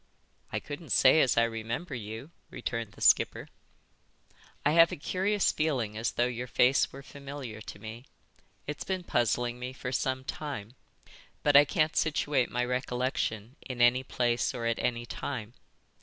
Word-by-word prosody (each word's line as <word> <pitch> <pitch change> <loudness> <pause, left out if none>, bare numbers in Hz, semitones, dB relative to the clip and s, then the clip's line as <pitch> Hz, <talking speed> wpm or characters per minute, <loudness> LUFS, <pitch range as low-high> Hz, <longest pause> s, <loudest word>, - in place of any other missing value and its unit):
"I - - -1
couldn't 150 +1 -8
say 145 +4 +6
as 130 - +2
I 115 - +6
remember 115 +8 -3
you," 115 +5 -6 0.2
returned 115 -3 -4
the - - -16
skipper. - - +4 1.2
"I 150 - +5
have 165 +1 +6
a - - -2
curious 190 +7 +1
feeling 130 -9 -1
as 110 +2 -1
though 120 - +2
your 125 0 -3
face 125 +2 +3
were 140 +1 -10
familiar 140 -6 -8
to 105 - -9
me. 110 +4 -9 0.6
It's 150 +1 -5
been 185 -1 -3
puzzling 120 -4 0
me 125 +1 -5
for 125 -1 -5
some 130 0 -1
time. 130 -7 -5 0.7
But 145 - +3
I 145 +1 +9
can't 155 +2 +1
situate 145 -4 +1
my 125 +2 0
recollection 125 -2 -2
in 130 -2 -7
any 120 +2 +5
place 120 -1 0
or 120 -2 -3
at 115 0 0
any 120 -1 -1
time." 120 -2 -5
125 Hz, 160 wpm, -29 LUFS, 115-145 Hz, 1.2 s, I